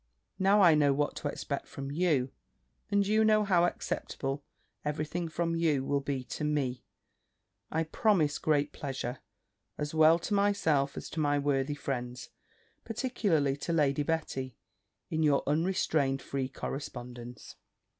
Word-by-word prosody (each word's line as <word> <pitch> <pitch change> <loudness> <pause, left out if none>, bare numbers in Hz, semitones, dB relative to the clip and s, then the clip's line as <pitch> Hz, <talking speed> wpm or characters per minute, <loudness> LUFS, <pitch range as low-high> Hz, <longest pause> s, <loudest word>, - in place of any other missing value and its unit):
Now 195 +2 +5
I 170 -3 +8
know 145 -2 +4
what 145 +1 0
to - - -3
expect 140 -1 -4
from 135 0 -6
you, 145 -5 +1 0.6
and 200 0 +3
you 215 +2 +3
know 215 -1 +4
how 180 -4 +4
acceptable 140 -4 -3 0.4
every 150 +1 -1
thing 170 +2 -3
from 165 +1 -1
you 155 -5 +2
will 140 0 +1
be 135 -2 -3
to 140 - -6
me, 135 -5 -1 0.9
I 160 +1 0
promise 160 -3 +2
great 145 -1 +1
pleasure, 130 -3 -4 0.6
as 150 0 -3
well 160 +1 +6
to 175 +5 -4
myself 195 -9 +2
as - - -5
to 160 - -4
my 145 -1 +2
worthy 140 0 0
friends, 125 -3 -4 0.5
particularly 205 - 0
to 170 +4 -3
Lady 145 -3 +2
Betty, 145 -5 -2 0.5
in 160 -1 0
your 145 -3 +3
unrestrained 150 -4 +1
free 135 -2 -3
correspondence. 125 -3 -7
150 Hz, 145 wpm, -30 LUFS, 135-170 Hz, 0.9 s, I